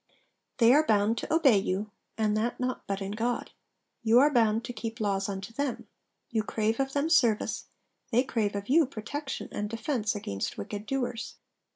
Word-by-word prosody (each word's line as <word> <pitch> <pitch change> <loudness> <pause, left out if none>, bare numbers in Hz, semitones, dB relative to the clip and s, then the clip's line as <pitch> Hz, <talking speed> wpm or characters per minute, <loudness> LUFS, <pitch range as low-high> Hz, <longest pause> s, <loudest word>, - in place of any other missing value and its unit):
They 235 -1 +6
are 300 +3 +6
bound 215 -3 +2
to - - -5
obey 280 -10 +5
you, 195 +2 -2 0.3
and 215 -1 +1
that 225 +3 -1
not 255 0 -3
but 195 0 -2
in 195 - -4
God. 230 +3 -2 0.5
You 230 +1 +4
are 290 +3 +6
bound 225 -2 +3
to 245 - -5
keep 225 +1 -5
laws 200 -2 0
unto 195 +2 -5
them. 280 0 -2 0.5
You 225 -2 +1
crave 220 +2 -1
of 270 0 -1
them 285 +2 +1
service: 240 -10 +2 0.5
they 245 +2 +4
crave 215 -6 -1
of 200 0 -4
you 310 +2 +4
protection 270 +4 -5
and 210 0 -3
defence 225 -1 -1
against 100 - -4
wicked 205 - -6
doers.' 245 -2 -3
225 Hz, 180 wpm, -29 LUFS, 210-255 Hz, 0.5 s, They